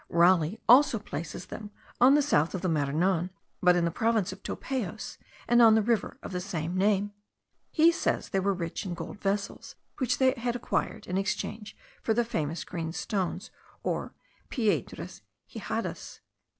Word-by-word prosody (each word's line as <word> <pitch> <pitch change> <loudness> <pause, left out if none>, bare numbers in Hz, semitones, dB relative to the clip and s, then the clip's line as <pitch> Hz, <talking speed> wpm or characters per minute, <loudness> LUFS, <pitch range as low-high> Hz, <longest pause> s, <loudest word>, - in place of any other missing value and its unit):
Raleigh 170 +2 +4
also 250 0 +7
places 170 -3 -6
them 210 -1 -8 0.3
on 260 +3 +7
the 295 - +4
south 165 - +2
of 185 - -4
the - - +1
Maranon, 165 +4 +1 0.3
but 180 -1 +5
in 175 -1 +2
the 170 - 0
province 220 0 +1
of 190 - -13
Topayos, 220 -6 -4 0.3
and 240 0 +5
on 225 -2 +8
the 220 - +3
river 230 0 0
of - - -6
the 180 -1 -2
same 175 -3 -3
name. 205 +1 +2 0.6
He 330 +1 +5
says 335 - -1
they 195 - +1
were 200 +1 +1
rich 170 -3 -3
in 180 -3 -4
golden 170 +3 -7
vessels, 200 0 -3 0.2
which 260 +1 +1
they 260 -1 +4
had 240 -2 -2
acquired 245 - -2
in 185 +1 -1
exchange 210 +1 -3 0.2
for 220 - +1
the 240 0 +2
famous 160 -7 -2
green 165 -3 -4
stones, 190 0 -3 0.3
or - - -2 0.3
piedras 220 -6 -2 0.3
hijadas. - - -5
200 Hz, 165 wpm, -28 LUFS, 175-230 Hz, 0.6 s, on